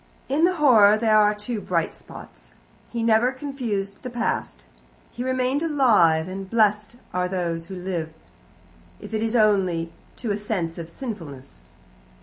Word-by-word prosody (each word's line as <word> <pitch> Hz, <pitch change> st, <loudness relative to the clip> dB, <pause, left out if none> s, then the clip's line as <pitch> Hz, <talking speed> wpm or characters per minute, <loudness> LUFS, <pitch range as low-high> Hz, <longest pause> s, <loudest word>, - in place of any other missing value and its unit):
In 295 Hz, +5 st, +3 dB
the 365 Hz, +1 st, +1 dB
horror 220 Hz, -9 st, +6 dB
there 220 Hz, -1 st, +2 dB
are 210 Hz, 0 st, +3 dB
two 210 Hz, +1 st, -4 dB
bright 170 Hz, -3 st, -1 dB
spots. -, -, -14 dB, 0.4 s
He 235 Hz, -1 st, -3 dB
never 230 Hz, +2 st, +3 dB
confused 250 Hz, -8 st, -4 dB
the 255 Hz, -, -6 dB
past. 225 Hz, -, -3 dB, 0.5 s
He 245 Hz, -, -5 dB
remained 260 Hz, +2 st, 0 dB
alive, 220 Hz, -, +3 dB
and 190 Hz, +1 st, -7 dB
blessed 210 Hz, 0 st, +1 dB, 0.2 s
are 180 Hz, 0 st, 0 dB
those 170 Hz, -3 st, -3 dB
who 190 Hz, -, -7 dB
live, 180 Hz, -3 st, -4 dB, 0.9 s
if -, -, -10 dB
it 215 Hz, -, -1 dB
is 225 Hz, +1 st, -1 dB
only 185 Hz, -7 st, +2 dB, 0.2 s
to 230 Hz, -3 st, -4 dB
a 200 Hz, -, 0 dB
sense 185 Hz, -6 st, -3 dB
of 165 Hz, 0 st, -7 dB
sinfulness. 165 Hz, -, -8 dB
210 Hz, 150 wpm, -24 LUFS, 175-240 Hz, 0.9 s, horror